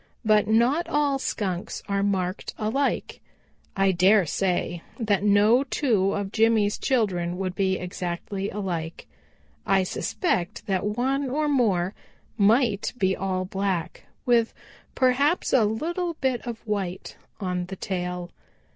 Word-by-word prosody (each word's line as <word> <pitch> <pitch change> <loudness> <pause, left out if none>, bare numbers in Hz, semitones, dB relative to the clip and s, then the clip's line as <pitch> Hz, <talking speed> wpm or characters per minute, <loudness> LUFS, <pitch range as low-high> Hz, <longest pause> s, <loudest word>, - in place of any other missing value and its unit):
But 215 -1 +4
not 240 +10 +2
all 290 -2 +1
Skunks 190 -8 -3
are 200 -1 0
marked 190 -2 -1
alike. 230 +6 -1 0.6
I 195 0 +4
dare 190 +2 +4
say 175 0 -1 0.2
that 210 -4 +1
no 210 +5 +5
two 225 -8 +1
of 200 -1 -3
Jimmy's 220 -2 +2
children 180 -9 0
would 185 -1 -2
be 190 0 +1
exactly 180 +2 -4
alike. 170 -5 -4 0.6
I 195 -1 +3
suspect 185 - -2
that 190 -2 0
one 270 +2 0
or 300 +4 0
more 205 -10 +1 0.4
might 215 0 +2
be 190 -4 +2
all 185 -1 -2
black, 190 -3 -3 0.2
with 235 -2 +2 0.4
perhaps 275 +6 +2
a 235 -5 +5
little 335 - -2
bit 260 -4 -1
of 235 -1 -6
white 195 -4 -3 0.2
on 180 -3 -2
the 190 - -6
tail. 180 -2 -4
205 Hz, 130 wpm, -25 LUFS, 185-240 Hz, 0.6 s, no